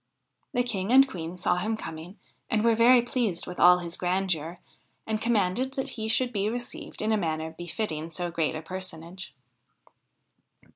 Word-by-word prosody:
The 245 - +3
King 205 -4 -2
and 270 +1 +8
Queen 175 -5 -6
saw 180 0 +1
him 215 +5 -1
coming 165 +2 -8 0.3
and 220 -3 +2
were 230 0 +5
very 235 +2 +6
pleased 235 -8 -1
with 180 - -7
all 180 +1 +8
his 170 -1 -5
grandeur, 180 -2 -1 0.5
and 220 -1 -2
commanded 235 +3 +1
that 265 - -2
he 220 -1 -4
should 245 +2 +1
be 205 0 0
received 240 0 -6
in 215 - +1
a 220 - +3
manner 160 -3 -2
befitting 170 -2 -3
so 175 +2 -3
great 165 -2 0
a 155 - -5
personage. 180 -2 -6
185 Hz, 165 wpm, -27 LUFS, 170-225 Hz, 0.5 s, and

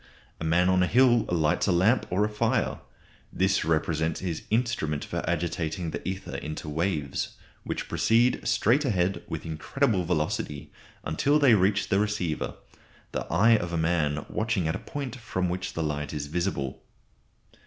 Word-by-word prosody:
A - - -5
man 85 +3 +3
on 95 0 +3
a 90 - +3
hill 120 +1 +4
lights 80 +1 +2
a - - +3
lamp 95 +8 +3
or 95 +3 +2
a - - 0
fire. 110 +2 0 0.5
This 95 +1 +1
represents 80 0 0
his 85 -4 -3
instrument 110 -11 0
for - - -3
agitating 85 0 -2
the - - -4
ether 95 +1 -4
into 75 +1 -6
waves, 75 -3 -2 0.3
which - - -3
proceed 120 +2 +3
straight 125 +7 +3
ahead 95 -7 0
with - - -5
incredible 95 - 0
velocity 75 -3 -2 0.3
until 140 - +2
they 140 -5 +6
reach 100 0 +2
the 95 - +3
receiver, 105 -7 -1 0.6
the - - -4
eye 115 +2 +5
of 85 -4 -4
a - - 0
man 80 -2 0
watching 110 -6 -1
at 80 - 0
a - - -4
point 135 -3 -6
from 95 -7 -2
which 90 +1 -3
the 80 - -2
light 75 -1 -3
is 75 -1 -3
visible. 75 -4 -2
90 Hz, 165 wpm, -27 LUFS, 80-105 Hz, 0.6 s, they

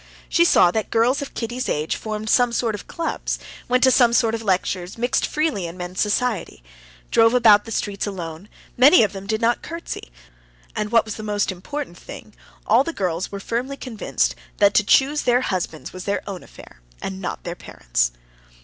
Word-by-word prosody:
She 340 - +3
saw 180 - +5
that 220 +1 -2
girls 240 +5 +2
of 280 - -7
Kitty's 245 +2 -3
age 150 +1 -1
formed 215 0 -5
some 245 +2 +4
sort 235 -1 0
of 205 - -7
clubs, 335 -1 -3 0.3
went 250 +1 +2
to 260 - +6
some 240 -2 +5
sort 230 -1 +3
of 225 - -2
lectures, 185 -2 -1
mixed 245 +2 +1
freely 300 - -1
in 170 +2 -9
men's 180 +1 -4
society; 210 - -1 0.5
drove 225 +1 +5
about 215 -4 +6
the 225 - -8
streets 205 -2 -2
alone, 175 -1 -6 0.3
many 270 +4 +7
of 210 - 0
them 195 0 -8
did 220 0 -1
not 235 +1 +2
curtsey, 335 - -7 0.6
and, 210 0 -2
what 230 -1 +4
was 220 - -6
the - - -6
most 205 -1 -1
important 190 +2 -6
thing, 215 - -11 0.3
all 230 +5 +4
the 335 - -4
girls 180 - -2
were 200 - -5
firmly 245 +7 -3
convinced 235 -6 -1 0.2
that 200 -1 +4
to 210 - +4
choose 275 +8 +3
their 245 0 +3
husbands 180 -8 -3
was 185 0 -8
their 200 0 -1
own 195 -3 -5
affair, - - -15 0.2
and 190 0 -5
not 180 - -5
their 170 - -4
parents'. - - -1
215 Hz, 195 wpm, -22 LUFS, 190-245 Hz, 0.6 s, many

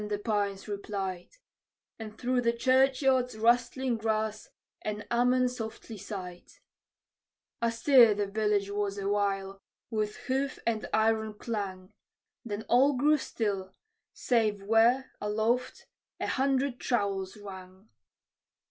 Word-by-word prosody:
the 205 - -1
pines 205 -2 -2
replied; 195 -3 -4 0.7
And 215 -1 -8
through 250 0 0
the 235 -1 +2
churchyard's 260 0 +2
rustling 240 +2 +2
grass 220 -1 -2 0.3
an 210 -1 -4
"Amen" 250 +1 +3
softly 225 -2 -7
sighed. 180 -3 -8 1.1
Astir 235 -1 +5
the 205 0 0
village 210 0 0
was 205 -1 -2
awhile, 195 -1 -1 0.3
with 215 -1 -1
hoof 270 +1 -1
and 225 -2 -1
iron 220 0 +1
clang; 200 -3 -5 0.5
Then 210 -1 -5
all 265 +4 +4
grew 300 +4 +4
still, 195 -7 -3 0.4
save 215 -5 0
where, 230 +5 +3
aloft, 220 +4 -1 0.3
a - - -2
hundred 270 -1 0
trowels 200 -4 -1
rang. 190 0 -11
220 Hz, 110 wpm, -29 LUFS, 200-245 Hz, 1.1 s, Astir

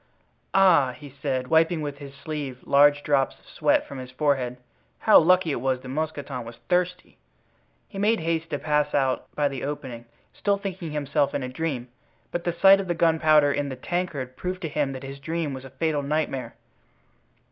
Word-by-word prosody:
"Ah!" 170 -9 +5
he 145 -1 -11
said, 130 -3 -1
wiping 165 +1 +3
with 145 -1 -5
his 140 -1 -10
sleeve 140 -2 -5
large 145 +1 +4
drops 140 -2 +1
of - - -27
sweat - - +1
from 140 - -7
his 130 -1 -8
forehead, 130 -2 0 0.4
"how 215 - +7
lucky 180 0 +3
it 120 - -2
was 130 -1 0
that 130 - -9
Mousqueton 145 -3 -3
was 115 +1 -10
thirsty!" 180 0 -1 0.7
He 195 - -8
made 215 +3 +2
haste 165 0 -2
to 145 - -2
pass 150 0 0
out 135 -2 0
by 145 -1 +2
the 135 -2 -5
opening, 130 -5 -5 0.3
still 200 0 0
thinking 190 -4 -5
himself 145 -1 0
in 140 - -1
a - - -3
dream; 130 -3 -3 0.4
but 175 0 -3
the 175 - 0
sight 195 +3 +6
of 195 - -4
the 175 - -1
gunpowder 155 -3 +4
in 145 0 -2
the 130 - -5
tankard 140 -3 -3
proved 185 +4 -5
to 160 - -2
him 145 -2 -1
that 130 0 -8
his 135 +1 -8
dream 160 0 -3
was 130 0 -8
a - - -9
fatal 150 +2 -1
nightmare. 140 -2 -2
145 Hz, 190 wpm, -25 LUFS, 135-165 Hz, 0.7 s, how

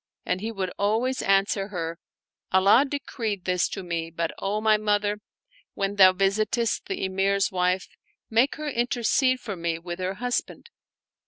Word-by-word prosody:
And 185 - -1
he 225 +2 -3
would 190 -4 -3
always 225 +6 +1
answer 195 0 +2
her, 170 -4 -5 0.3
" - - -58
Allah 195 +8 +5
decreed 225 -9 -4
this 180 -1 +1
to 195 - -6
me; 170 -2 -3
but, 165 0 -2
O 200 +2 -1
my 215 0 +4
mother, 210 0 0 0.6
when 200 +1 -2
thou 190 -1 +8
visitest 210 +4 0
the 390 - -2
Emir's 195 +1 +1
wife, 180 0 0 0.4
make 235 +5 +2
her 305 0 -5
intercede 255 0 +1
for 210 -5 -5
me 170 -1 -2
with 175 +1 -7
her 185 +1 -2
husband." 245 - -3
200 Hz, 160 wpm, -25 LUFS, 185-225 Hz, 0.6 s, thou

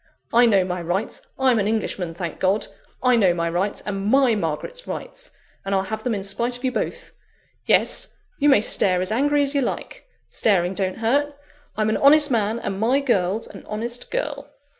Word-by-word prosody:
I 240 +1 +6
know 200 -4 +4
my 180 -1 -3
rights; 180 +6 -3 0.2
I'm 260 -4 +3
an 205 - 0
Englishman, 195 -6 -2
thank 170 -1 -5
God! 195 +3 +1 0.4
I 250 -1 +4
know 190 -6 +3
my 170 -1 -1
rights, 180 +5 -2
and 195 -1 -3
my 265 +1 +4
Margaret's 205 - -4
rights; - - -7 0.3
and 195 0 -1
I'll 190 - +1
have 220 +2 -5
them 245 -3 -1
in 195 - -4
spite 235 +5 -1
of 245 - -17
you 255 - +1
both. - - -4 0.6
Yes! - - +3 0.2
you 295 0 +4
may 270 -7 +5
stare 185 -4 +2
as 185 - -1
angry 290 +5 +2
as 280 0 -2
you 280 - +1
like; - - -5 0.2
staring 185 -4 +2
don't 190 -1 -2
hurt. 280 +6 0 0.4
I'm 215 0 +1
an - - +1
honest 290 +1 +5
man, 220 -1 +1
and 195 -4 -4
my 245 +6 +2
girl's 215 -6 0
an - - -12
honest 235 +3 -5
girl!" 285 -1 -4
220 Hz, 195 wpm, -22 LUFS, 195-265 Hz, 0.6 s, I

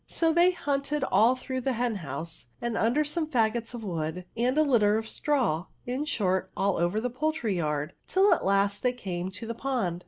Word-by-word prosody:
So 325 -1 +1
they 345 +2 +5
hunted 290 -4 -1
all 240 -1 +4
through 260 0 -4
the 265 +1 0
hen 235 -2 -1
house, 160 -2 -6
and 235 -1 -2
under 245 +7 +2
some 310 +2 -1
faggots 230 -3 0
of 230 - -7
wood, 170 -1 -3
and 245 +4 +1
a 310 - +6
litter 220 -7 +3
of 220 0 -3
straw, 230 - 0 0.2
in 255 +4 -2
short, 190 -9 0
all 195 -1 +1
over 175 +5 +1
the 250 +2 -2
poidtryyard, 190 - -1 0.2
till 385 0 +4
at - - -1
last 200 +1 +2
they 250 -1 +1
came 185 -6 -4
to 205 +4 -8
the 230 - -3
pond. 230 -9 -2
230 Hz, 195 wpm, -28 LUFS, 190-275 Hz, 0.2 s, a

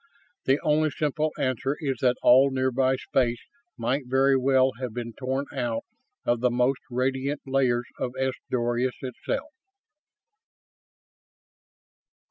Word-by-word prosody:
The 135 +2 +3
only 155 +1 +3
simple 150 +1 -1
answer 130 +2 -1
is 135 -4 -2
that 125 -1 +3
all 130 +3 +7
nearby 130 0 +1
space 120 -2 0 0.4
might 125 +3 -1
very 135 +1 +3
well 130 0 +3
have 125 -4 -5
been 120 -1 -5
torn 130 +2 -2
out 120 -4 -2 0.4
of 120 -1 +2
the 125 +1 +3
most 125 +2 +1
radiant 130 +3 -1
layers 130 -3 +1
of 125 - -2
S 130 0 +1 0.2
Doradus 120 +1 0
itself. 270 - -4
130 Hz, 120 wpm, -26 LUFS, 125-135 Hz, 0.4 s, all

